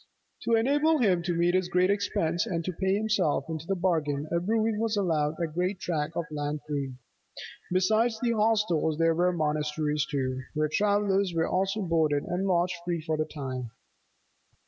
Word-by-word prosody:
To 230 - +3
enable 290 +7 +3
him 195 -9 +2
to 175 0 -2
meet 170 +1 +3
this 185 0 +1
great 180 +2 +2
expense 185 -3 0
and 170 -5 -2
to 185 - -2
pay 190 +3 0
himself 200 -10 +1
into 160 0 -5
the 195 - 0
bargain, 155 -5 0
a 170 - +2
brewy 220 +4 +1
was 220 0 -1
allowed 160 -6 +1
a 170 - +1
great 180 +4 -2
tract 160 -2 -2
of 170 - 0
land 145 0 -3
free. 140 -3 -3 0.8
Besides 220 +5 +2
the 240 -1 +1
hostels, 210 -8 +1
there 165 0 +3
were 175 +2 +2
the 175 - -5
monasteries, 150 -1 0
too, 130 -2 -2
where 155 0 +1
travellers 200 -2 +2
were 165 - +1
also 195 +3 0
boarded 160 -4 +1
and 180 +2 -2
lodged 180 0 +1
free 175 -2 -2
for 160 - 0
the 155 0 -1
time. 130 -5 -5
175 Hz, 180 wpm, -28 LUFS, 155-200 Hz, 0.8 s, To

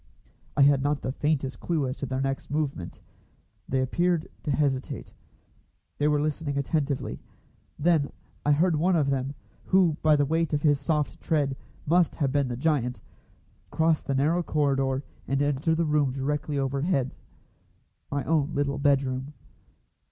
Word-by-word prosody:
I 140 - +7
had 140 -1 +5
not 145 +1 0
the 130 - -1
faintest 140 -1 -1
clue 155 -6 0
as 130 - -4
to 140 - -3
their 130 +1 -2
next 135 0 -2
movement. 140 - -3 0.7
They 130 0 +1
appeared 170 +5 +1
to - - -5
hesitate. 135 -2 -1 0.9
They 145 - +3
were 150 -1 +3
listening 150 -1 -2
attentively. 140 -1 -1 0.6
Then 155 -2 +2 0.3
I 150 - +3
heard 165 +3 +3
one 180 +4 +2
of 145 -4 +2
them, 135 +1 -2 0.3
who 180 -5 +3
by 155 -1 +5
the 145 -1 +2
weight 160 +2 0
of 145 - 0
his 145 -3 +4
soft 145 -5 -1
tread 145 -4 +1 0.3
must 170 +2 +3
have 140 -4 0
been 140 -1 +1
the 120 -1 -4
giant, 130 -4 0 0.7
cross 160 -1 +2
the 135 - -2
narrow 155 +6 +2
corridor 135 -4 0 0.2
and 135 +1 0
enter 145 +3 +1
the 165 +1 +1
room 150 -3 +2
directly 145 +2 -2
overhead 135 +1 0 1.0
my 140 -1 -1
own 155 +1 +1
little 140 0 0
bedroom. 135 0 +1
145 Hz, 155 wpm, -27 LUFS, 135-155 Hz, 1.0 s, I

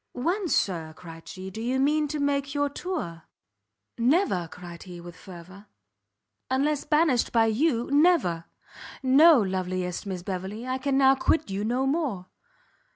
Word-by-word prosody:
"When, 355 +10 -1
Sir," 165 - -1
cried 165 -2 -12
she, 190 0 -8
"do 220 - -7
you 250 +3 -1
mean 300 +2 +2
to 300 +1 -4
make 280 0 -1
your 285 0 +1
tour?" 280 - -5 0.7
"Never!" 240 - +2
cried 175 0 -10
he, 180 -2 -10
with 170 0 -11
fervour, 185 +3 -13 0.8
"unless 280 +3 0
banished 300 -5 +2
by 225 -1 +4
you, 235 +2 +1
never! 285 - +3 0.6
no, 285 +3 +7
loveliest 185 -2 -3
Miss 185 -2 -5
Beverley, 190 +5 -5
I 260 0 -2
can 270 0 0
now 270 -1 +6
quit 280 -1 0
you 195 +1 -2
no 245 +4 0
more! 270 - -1
240 Hz, 150 wpm, -26 LUFS, 185-285 Hz, 0.8 s, no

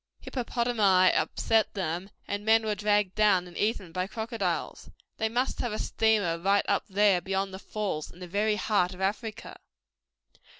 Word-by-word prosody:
Hippopotami 230 -7 +2
upset 225 -1 +1
them, 180 0 -3 0.2
and 205 0 -3
men 220 +1 +4
were 215 - 0
dragged 205 -2 +1
down 200 -4 +3
and 175 - -14
eaten 205 -5 -1
by 185 +2 -2
crocodiles. 220 -5 -3 0.3
They 220 - 0
must 245 +4 -1
have 240 - -1
a - - -2
steamer 210 -9 +1
right 195 +3 +2
up 200 - 0
there 200 -2 +3
beyond 195 +1 -2
the 190 - -7
Falls 200 -7 -4
in - - -16
the 180 0 -8
very 210 +4 +1
heart 195 -4 0
of 185 - -11
Africa. 215 +3 -3
205 Hz, 165 wpm, -28 LUFS, 185-220 Hz, 0.3 s, men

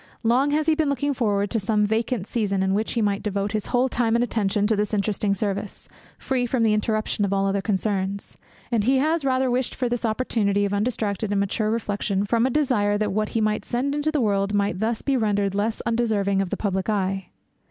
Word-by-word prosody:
Long 250 +5 +3
has 300 +1 +1
he 320 - +4
been 310 -2 +1
looking 280 +1 0
forward 205 -5 0
to 230 - +1
some 210 +1 +1
vacant 220 0 -1
season, 200 -4 -1
in 190 0 +1
which 215 +3 -1
he 230 - +1
might 205 -1 0
devote 200 -1 -2
his 215 -1 -2
whole 250 +1 +2
time 235 -2 0
and 235 - +3
attention 205 -3 0
to 220 +1 +2
this 210 +1 -1
interesting 200 0 0
service, 200 0 -3 0.3
free 250 -2 -1
from 240 -1 0
the 220 -1 +3
interruption 215 0 0
of 200 - 0
all 195 0 +1
other 195 0 0
concerns; 200 -1 -2 0.4
and 220 -3 +1
he 265 +2 +4
has 310 +4 +1
the 275 - -2
rather 260 -1 +1
wished 250 0 -1
for 255 - -1
this 240 0 -2
opportunity 215 -3 +1
of 200 - -2
undistracted 210 -1 -1
and 200 -1 +1
mature 205 +2 0
reflection, 205 -3 -1
from 230 +4 +2
a - - 0
desire 240 -8 +1
that 210 -2 -1
what 215 +1 0
he 225 - -1
might 215 0 0
send 260 +4 -1
into 295 +1 0
the 300 -3 0
world 200 -2 +1
might 200 -3 0
thus 225 +1 -1
be 275 - +1
rendered 205 -4 +1
less 210 +3 -1
undeserving 215 -4 +1
of 195 - -2
the - - -3
public 190 -1 -2
eye. 195 -2 -1
215 Hz, 225 wpm, -24 LUFS, 200-240 Hz, 0.4 s, he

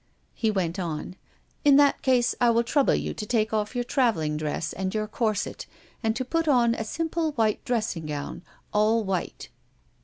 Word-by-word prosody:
He 225 - 0
went 190 -3 -1
on: 170 0 -4 0.5
"In 285 -2 +6
that 285 0 +4
case, 250 -2 +3
I 240 - +5
will 235 0 +3
trouble 270 +4 +2
you - - -2
to - - -6
take 220 -2 +1
off 215 +2 -1
your 245 - 0
traveling 225 - +1
dress 150 +1 -3
and 190 +2 -3
your 215 0 0
corset, 215 -1 -2 0.3
and 225 -2 0
to 260 +2 -2
put 330 +5 -1
on 240 -5 +4
a 225 - -3
simple 320 +5 -2
white 220 -5 +1
dressing 215 -10 -1
gown, 145 +1 -5 0.3
all 215 +2 +3
white." 190 -3 -3
220 Hz, 180 wpm, -26 LUFS, 195-250 Hz, 0.5 s, In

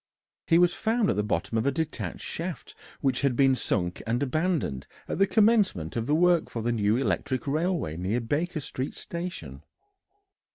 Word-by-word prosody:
He 165 - +5
was 175 0 +4
found 225 -1 +1
at - - -1
the 105 - +1
bottom 110 +1 -1
of 110 - -1
a - - +4
detached 160 +1 -4
shaft 170 -2 -5 0.3
which 135 -3 +1
had 140 -3 +2
been 135 +1 +4
sunk 90 -8 -1
and 120 +4 +1
abandoned 150 - -1 0.2
at - - -3
the 195 - +5
commencement 205 - +2
of 115 0 -2
the 150 - +3
work 175 0 +3
for 115 - -4
the 120 - +1
new 110 -1 +2
electric 130 -1 -1
railway 155 - -1
near 95 +7 -1
Baker 155 +7 -2
Street 130 0 -4
Station. 175 +1 -6
140 Hz, 175 wpm, -27 LUFS, 115-175 Hz, 0.3 s, He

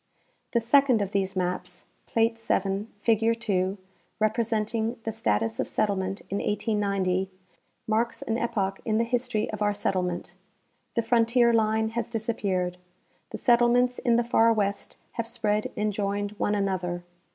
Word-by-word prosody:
The 235 - +4
second 250 +1 +4
of 195 - -5
these 195 -1 -1
maps 180 0 -3 0.2
(plate 230 -1 +1
7, 200 -1 -1
figure 225 +1 +3
2), 195 -4 -1 0.4
representing 220 +1 0
the 225 - -2
status 115 - 0
of - - 0
settlement 195 -1 -1
in 200 - 0
1890, 200 -3 0 0.6
marks 230 +1 0
an 225 - -1
epoch 200 -5 -1
in 220 -1 0
the 230 - +3
history 240 -2 -1
of 215 -1 -6
our 205 0 +2
settlement. 180 -3 -2 0.6
The 230 - +2
frontier 235 +1 +3
line 220 0 +2
has 230 0 -3
disappeared. 200 -6 -1 0.5
The - - -5
settle 240 -1 +4
ments 245 +1 +2
in 240 -3 +2
the 240 - +3
far 230 -1 +4
west 200 -2 -1
have 230 -1 -3
spread 210 -1 -1
and 210 0 0
joined 205 0 -1
one 205 - +1
another. 185 -3 -1
215 Hz, 150 wpm, -27 LUFS, 195-230 Hz, 0.6 s, The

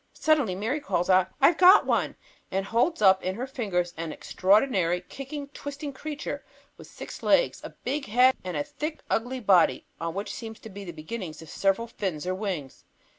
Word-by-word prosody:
Suddenly 290 -12 +2
Mary 225 +10 -1
calls 190 - 0
out, 185 0 +5
"I've 310 +5 +5
got 370 +3 +8
one," - - 0 0.3
and 195 +1 -1
holds 235 - +1
up 190 -1 +6
in 185 +1 -2
her 245 +4 -3
fingers 195 -10 -2
an 165 -1 -4
extraordinary, 190 - +2
kicking, 280 +7 -7
twisting 285 0 -7
creature 295 +2 -5 0.3
with - - -13
six - - -9
legs, - - +3
a - - -6
big 275 +1 -2
head, 250 +5 +5
and 180 -4 -4
a 145 - 0
thick, 305 - -5
ugly 250 +3 -1
body 190 -5 +4
on 165 +1 -3
which 200 +1 -4
seem 225 -1 -7
to 220 - -12
be 200 +1 -8
the 175 - -6
beginnings 165 +1 -7
of 160 - -13
several 195 +4 +1
fins 185 -8 -4
or 185 - 0
wings. 185 -9 -5
210 Hz, 185 wpm, -27 LUFS, 185-270 Hz, 0.3 s, got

